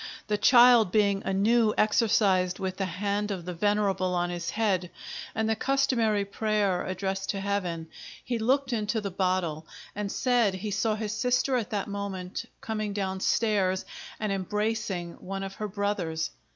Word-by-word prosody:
The 210 - 0
child 240 -2 +7
being 200 -1 +2
anew 215 +3 +3
exorcised 200 -4 +3
with 185 -1 -3
the 195 - -1
hand 200 +3 -2
of 185 -4 -4
the 180 - -4
Venerable 195 -1 +1
on 175 0 0
his 175 -1 -3
head, 195 -5 0 0.5
and 220 0 0
the 220 - +2
customary 230 -5 +1
prayer 205 -2 0
addressed 190 +1 -3
to 200 - -1
Heaven, 185 -5 -2 0.4
he 240 -2 -1
looked 260 +3 +1
into 215 0 0
the 200 -2 -4
Bottle, 180 -4 -1 0.3
and 205 -1 -3
said 240 -6 +2
he 205 +3 -4
saw 215 +2 +1
his 215 -1 -3
sister 250 +4 +1
at 235 -4 -1
that 205 -2 -2
moment 200 0 -4 0.2
coming 215 -2 -3
down 190 -2 -2
stairs, 195 -3 +1 0.3
and 215 -1 -1
embracing 195 -2 -2
one 195 +1 -5
of 195 0 -5
her 215 - -4
brothers. 195 -6 -2
200 Hz, 160 wpm, -28 LUFS, 185-215 Hz, 0.5 s, child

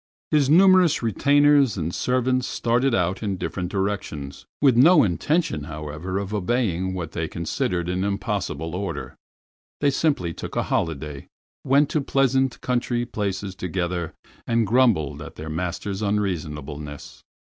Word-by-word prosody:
His 145 -3 +3
numerous 185 -2 +5
retainers 140 +1 +4
and 85 0 -2
servants 130 0 0
started 120 +2 +1
out 90 -1 0
in 100 -3 -2
different 90 -1 -4
directions, 95 -8 -4
with 135 -4 +4
no 150 +6 +7
intention, 105 - 0
however, 75 +4 -5
of 100 +1 -4
obeying 95 -3 0
what 85 -3 -5
they 80 -1 -3
considered 85 +1 -2
an 90 +1 -1
impossible 95 -5 -2
order. 95 +2 -4 0.6
They 145 -1 +3
simply 135 - 0
took - - -7
a - - +1
holiday, 75 -3 -3 0.4
went 140 +2 +4
to 155 - +1
pleasant 135 -1 +1
country 120 -1 -1
places 100 -3 -3
together, 90 -2 -3 0.3
and 115 -1 +2
grumbled 100 - +2
at - - -9
their 80 +1 -7
master's 90 +5 -3
unreasonableness. 75 -8 -4
100 Hz, 135 wpm, -23 LUFS, 85-130 Hz, 0.6 s, no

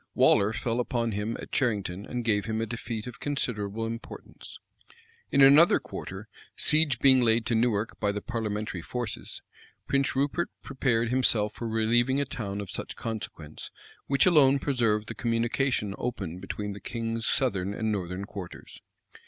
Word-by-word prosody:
Waller 100 +2 +5
fell 115 +1 -2
upon 120 -1 -1
him 105 +3 -2
at - - -8
Cherington, 100 -6 -1
and 120 -2 -4
gave 105 -3 +2
him 110 -1 -2
a 115 - 0
defeat 115 -1 -5
of 125 -2 -9
considerable 115 -6 -2
importance. 115 +1 -8 0.7
In 140 - +6
another 145 +5 +7
quarter, 110 -5 -8 0.3
siege 155 -2 +3
being 130 -2 +5
laid 115 -1 +3
to 115 - 0
Newark 110 -2 0
by 100 - +1
the 105 - -3
parliamentary 105 -5 -3
forces, 120 +4 -5 0.4
Prince 140 -1 +1
Rupert 145 +5 0
prepared 120 -4 0
himself 115 -4 +2
for 115 - -5
relieving 120 +4 +2
a 140 - +1
town 105 -8 -4
of 100 - -7
such - - -5
consequence, 100 -9 -6 0.4
which 140 0 +4
alone 145 -6 +6
preserved 115 -7 0
the - - -4
communication 115 -2 0
open 90 -8 -4
between 100 +2 -5
the 100 - -9
king's 115 0 -3
southern 100 -8 +1
and 110 0 -1
northern 95 -1 -3
quarters. 95 -3 -9
115 Hz, 155 wpm, -28 LUFS, 105-125 Hz, 0.7 s, another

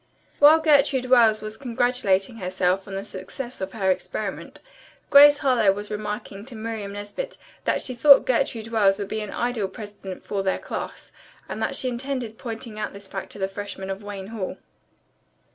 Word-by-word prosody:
While 295 +2 +8
Gertrude 275 -4 +3
Wells 225 -4 +6
was 215 0 -7
congratulating 235 -4 0
herself 185 0 0
on 195 - -6
the 195 - -3
success 210 +5 -7
of 190 0 -4
her 190 -4 +1
experiment, - - -4 0.5
Grace 290 +1 +9
Harlowe 235 -7 +4
was 205 +1 -7
remarking 210 -1 -5
to 255 -2 -9
Miriam 220 -2 -5
Nesbit 205 - -6 0.3
that - - +1
she 255 - -4
thought 280 +3 +7
Gertrude 230 -3 0
Wells 200 -4 +3
would 200 -1 -5
be 220 - -2
an 210 - -5
ideal 240 -4 -1
president 200 -1 -9
from 195 -1 -2
19 190 - -2 0.6
and - - -5
that - - -1
she 260 - -2
intended 250 -2 -4
pointing 225 -2 -6
out 210 - -3
this 200 0 -10
fact 195 0 -6
to - - -10
the 190 -1 -1
freshmen 195 -1 -6
of 195 +2 -5
Wayne 200 -1 -7
Hall. 215 -5 -5
215 Hz, 175 wpm, -24 LUFS, 195-245 Hz, 0.6 s, Grace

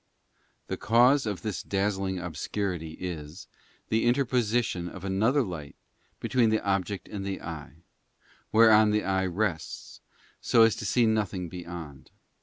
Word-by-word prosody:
The - - -4
cause 125 +3 +4
of 100 -3 -4
this 105 -3 -3
dazzling 95 -1 -1
obscurity 90 -1 -4
is, 80 0 -7 0.4
the 110 +1 +1
interposition 120 -7 +1
of 95 +1 -10
another 110 +9 +2
light 85 -8 -7 0.4
between 125 -3 +2
the 110 0 +2
object 100 0 -1
and 100 -2 -6
the 95 -1 -3
eye, 80 0 -9 0.7
whereon 110 -1 +6
the 105 0 +1
eye 95 0 0
rests, 90 -3 -3 0.4
so 115 - +5
as 115 -1 +4
to 105 - -4
see 115 +6 +3
nothing 105 -5 0
beyond. 85 -5 -8
100 Hz, 135 wpm, -28 LUFS, 90-110 Hz, 0.7 s, whereon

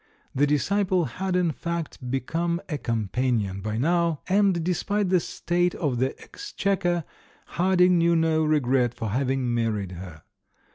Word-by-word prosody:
The 145 +2 +2
disciple 185 +4 +1
had, 190 +2 -3
in 180 -2 +2
fact, 165 -6 -5
become 165 +6 -1
a 150 -4 -3
companion 110 -3 -1
by 110 +2 -3
now, 165 +3 +1
and, 190 -3 +2
despite 190 +3 0
the 185 -1 +4
state 175 +1 -1
of 135 -7 -1
the 130 +1 -1
exchequer, 195 - -2 0.4
Harding 180 0 +3
knew 170 0 +3
no 160 -1 +2
regret 130 -5 +2
for 110 - -4
having 130 +1 0
married 110 -5 -1
her. 85 -4 -9
160 Hz, 140 wpm, -25 LUFS, 125-180 Hz, 0.4 s, the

